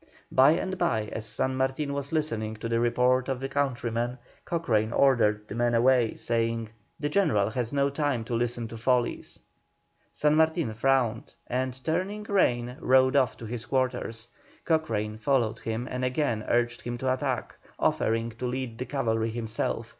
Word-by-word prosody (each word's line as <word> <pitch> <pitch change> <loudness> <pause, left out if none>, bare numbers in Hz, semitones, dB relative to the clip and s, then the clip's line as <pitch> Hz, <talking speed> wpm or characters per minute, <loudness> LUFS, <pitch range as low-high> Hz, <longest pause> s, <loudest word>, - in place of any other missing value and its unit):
By 135 +4 +6
and 185 +2 -2
by, 110 -11 0
as 110 -1 -5
San 130 +5 -1
Martin 135 +2 -1
was 140 0 -4
listening 115 -9 -1
to 110 +1 -5
the 115 0 +1
report 125 +2 +2
of 135 0 -2
a - - 0
countryman, 125 -3 -1 0.3
Cochrane 115 -11 0
ordered 105 -6 +3
the - - -7
man 120 +1 +1
away, 120 -1 +3
saying: 115 -1 -1 0.3
"The 145 - -1
General 110 - +2
has 120 0 -2
no 140 0 +1
time 140 -5 0
to 120 - -5
listen 120 0 -1
to 115 - -8
follies." 120 +1 0 0.7
San 150 0 +2
Martin 160 -6 +2
frowned, 120 -1 +1
and, 130 +1 -2
turning 185 +6 -1
rein, 125 - +1
rode 130 +1 +4
off 130 -4 +2
to 115 - -8
his 115 0 -6
quarters. 125 -3 -1 0.4
Cochrane 110 -10 0
followed 120 -4 +1
him 115 +2 -3
and 125 0 -3
again 125 -4 0
urged 120 0 +1
him 120 0 -4
to 130 +1 +1
attack, 130 -1 -2 0.2
offering 115 +1 +1
to 125 - -2
lead 125 -2 -4
the 125 - -2
cavalry 115 -4 0
himself. 115 -1 -3
125 Hz, 165 wpm, -27 LUFS, 115-135 Hz, 0.7 s, By